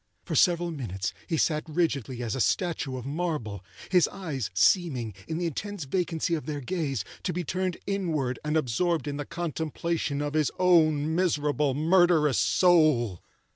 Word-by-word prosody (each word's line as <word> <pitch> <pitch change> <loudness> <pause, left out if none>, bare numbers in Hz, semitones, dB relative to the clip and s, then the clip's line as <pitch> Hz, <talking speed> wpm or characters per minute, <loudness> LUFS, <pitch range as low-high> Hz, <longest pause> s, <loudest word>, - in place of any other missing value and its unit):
For - - -5
several 175 -1 +3
minutes 105 - -4
he 165 - 0
sat 155 0 +1
rigidly 140 -7 -1
as 115 -3 -2
a 130 - -1
statue 155 -7 0
of 125 - -7
marble; 140 - -3 0.3
his 180 -3 +5
eyes 155 - -4
seeming, 125 - +2
in 160 - -3
the 175 - -1
intense 200 +3 -4
vacancy 170 +2 -1
of 160 -2 -2
their 150 -2 -3
gaze, 140 - -2 0.2
to - - -2
be 180 +2 -3
turned 185 +2 -2
inward 160 -11 -1
and 150 +1 0
absorbed 155 +3 0
in 145 0 -3
the 145 - -4
contemplation 165 -2 -2
of 145 0 -2
his 155 -2 +2
own 160 -4 +3
miserable, 150 -5 +1
murderous 160 -3 +4
soul. 155 - +3
155 Hz, 160 wpm, -27 LUFS, 135-175 Hz, 0.3 s, his